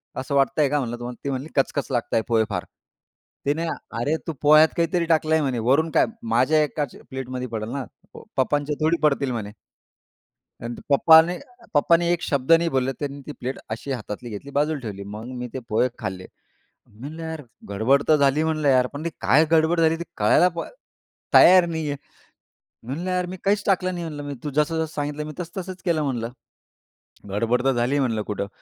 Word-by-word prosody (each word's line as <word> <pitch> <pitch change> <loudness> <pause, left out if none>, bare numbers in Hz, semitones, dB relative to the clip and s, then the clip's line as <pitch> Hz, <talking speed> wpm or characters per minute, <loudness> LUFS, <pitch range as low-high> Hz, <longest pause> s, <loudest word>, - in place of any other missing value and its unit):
असं 135 +2 -3
वाटतंय 140 +1 +3
का 145 +1 +1
म्हणलं 120 -3 -3
तुम्हाला?" 120 0 -8
ती 140 - -2
म्हणली, 135 +3 -4
"कचकच 140 +1 0
लागता 120 -3 -1
आहेत 110 - +2
पोहे 115 -2 +3
फार." 90 -4 -2 0.8
तिने 150 +4 0 0.3
"अरे 145 +7 +1
तू 165 - -2
पोह्यात 155 +1 +7
काहीतरी 170 0 +1
टाकलंय" 160 -1 +2
म्हणे 130 -4 -1
"वरून 160 +5 +3
काय? - - +4 0.3
माझ्या 155 +5 +4
एकाच्या 145 -2 -4
प्लेटमध्ये 130 -1 -5
पडेल 110 -2 -4
ना? 135 -1 -3 0.5
पप्पांच्या 145 +2 +1
थोडी 160 +2 +3
पडतील" 140 -3 +2
म्हणे. 110 -4 -4 1.1
आणि 120 +1 -4
तर - - -11
पप्पानी 160 +4 +6 0.4
पप्पानी 170 +4 +4
एक 175 - 0
शब्द 140 +2 0
नाही 165 +1 +5
बोलले, 130 -1 0
त्यांनी 140 -1 -5
ती 150 - -5
प्लेट 130 +2 -4
अशी 115 +5 -4
हातातली 120 -1 -6
घेतली 110 +7 -7
बाजूला 145 +1 0
ठेवली. 105 -5 -6
मग 105 +2 -8
मी 125 0 -5
ते 130 - -2
पोहे 115 +3 +2
खाल्ले. 95 0 -5 0.6
मी 105 - -22
म्हणल 150 +6 -8
यार 160 -1 -5 0.3
गडबड 115 +8 +2
तर 155 - +6
झाली 140 +2 +3
म्हणलं 155 -2 0
यार. 130 -1 +4
पण 145 +2 -6
ती - - 0
काय 155 +4 +4
गडबड 165 +1 +3
झाली 160 0 +4
ते 170 - -4
कळायला 180 - +4
पण 165 - -4 0.7
तयार 185 -1 +8
नाही 160 -2 -3
आहे. 145 - -3 0.9
मी 115 - -15
म्हणलं, 175 +6 -3
"यार 180 0 0
मी 185 +1 -6
काहीच 205 +1 +2
टाकलं 185 -2 +1
नाही 175 -1 -4
म्हंटलं 150 -3 -6
मी 145 - -4
तू 150 - -2
जसं-जसं 155 +3 0
सांगितलं 145 +1 -3
मी 155 - -6
तसं 175 +2 -5
तसंच 185 0 -8
केलं 170 -4 +1
म्हणलं. 120 -5 -2 1.0
गडबड 115 +5 0
तर 135 - +4
झाली 120 +4 +1
म्हणलं 115 -5 0
कुठं." 100 -1 -4
145 Hz, 195 wpm, -23 LUFS, 125-160 Hz, 1.1 s, तयार